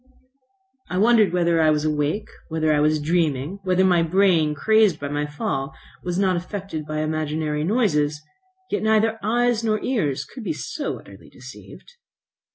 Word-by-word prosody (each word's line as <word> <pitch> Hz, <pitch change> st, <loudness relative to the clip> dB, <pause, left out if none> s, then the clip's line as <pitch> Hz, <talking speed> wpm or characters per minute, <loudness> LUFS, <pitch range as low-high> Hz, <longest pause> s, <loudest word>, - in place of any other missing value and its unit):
I 180 Hz, -, -2 dB
wondered 215 Hz, -2 st, +4 dB
whether 170 Hz, -2 st, +2 dB
I 155 Hz, -, +4 dB
was 150 Hz, 0 st, +1 dB
awake, 150 Hz, +7 st, -1 dB, 0.2 s
whether 155 Hz, -1 st, +1 dB
I 150 Hz, -, +2 dB
was 155 Hz, +1 st, +2 dB
dreaming, 160 Hz, +1 st, -1 dB
whether 185 Hz, 0 st, +2 dB
my 175 Hz, -2 st, +4 dB
brain, 165 Hz, -3 st, +2 dB
crazed 215 Hz, 0 st, +3 dB
by 145 Hz, -, -4 dB
my 145 Hz, 0 st, -2 dB
fall, 140 Hz, -1 st, -3 dB, 0.3 s
was 180 Hz, 0 st, -3 dB
not 190 Hz, -2 st, +2 dB
affected 180 Hz, -3 st, -5 dB
by 155 Hz, 0 st, -2 dB
imaginary 155 Hz, -1 st, -2 dB
noises. 155 Hz, -8 st, +1 dB, 0.5 s
Yet -, -, 0 dB
neither 220 Hz, +1 st, +2 dB
eyes, 235 Hz, +2 st, +1 dB
nor 215 Hz, -1 st, +1 dB
ears 145 Hz, -, -1 dB
could 250 Hz, -, -10 dB
be 320 Hz, -, -2 dB
so -, -, -5 dB
utterly -, -, -15 dB
deceived. 485 Hz, -, -13 dB
170 Hz, 160 wpm, -23 LUFS, 150-205 Hz, 0.5 s, wondered